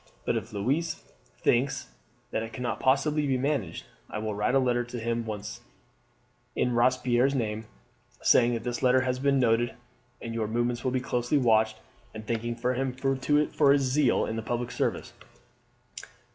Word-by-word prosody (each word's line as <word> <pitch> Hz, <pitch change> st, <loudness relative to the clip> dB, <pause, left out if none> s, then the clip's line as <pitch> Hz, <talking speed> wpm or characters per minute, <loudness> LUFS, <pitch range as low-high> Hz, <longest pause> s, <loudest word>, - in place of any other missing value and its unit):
But -, -, +1 dB
if -, -, -4 dB
Louise 140 Hz, +11 st, -1 dB, 0.5 s
thinks 125 Hz, -, +1 dB, 0.4 s
that -, -, -1 dB
it 115 Hz, 0 st, -6 dB
cannot 120 Hz, -2 st, -3 dB
possibly 150 Hz, +3 st, +2 dB
be 130 Hz, -1 st, +1 dB
managed, 130 Hz, -, -2 dB, 0.2 s
I -, -, -5 dB
will 110 Hz, 0 st, -3 dB
write 105 Hz, +5 st, 0 dB
a -, -, +6 dB
letter 125 Hz, -2 st, +2 dB
at -, -, 0 dB, 0.3 s
once 110 Hz, -1 st, -5 dB
to -, -, -22 dB
him -, -, -29 dB, 1.0 s
in -, -, -1 dB
Robespierre's 125 Hz, +2 st, +2 dB
name, 110 Hz, -3 st, -2 dB, 0.5 s
saying 120 Hz, 0 st, +4 dB
that 115 Hz, 0 st, -5 dB
his 120 Hz, -1 st, -3 dB
letter 130 Hz, 0 st, +4 dB
has 125 Hz, -1 st, -1 dB
been 140 Hz, 0 st, +2 dB
noted 120 Hz, -1 st, +2 dB, 0.4 s
and 115 Hz, -1 st, -6 dB
your 110 Hz, -2 st, -1 dB
movements 120 Hz, +1 st, -1 dB
will 130 Hz, -, +1 dB
be 130 Hz, 0 st, -1 dB
closely 125 Hz, +3 st, 0 dB
watched, 110 Hz, -4 st, +3 dB, 0.4 s
and 110 Hz, 0 st, -7 dB
thanking 115 Hz, +1 st, -2 dB
him 125 Hz, +2 st, -1 dB, 0.6 s
for 145 Hz, -2 st, +5 dB
his 140 Hz, -, +3 dB
zeal 130 Hz, 0 st, +2 dB
in 110 Hz, -, -4 dB
the -, -, -2 dB
public 120 Hz, +2 st, -3 dB
service." -, -, -2 dB
120 Hz, 170 wpm, -28 LUFS, 115-130 Hz, 1.0 s, a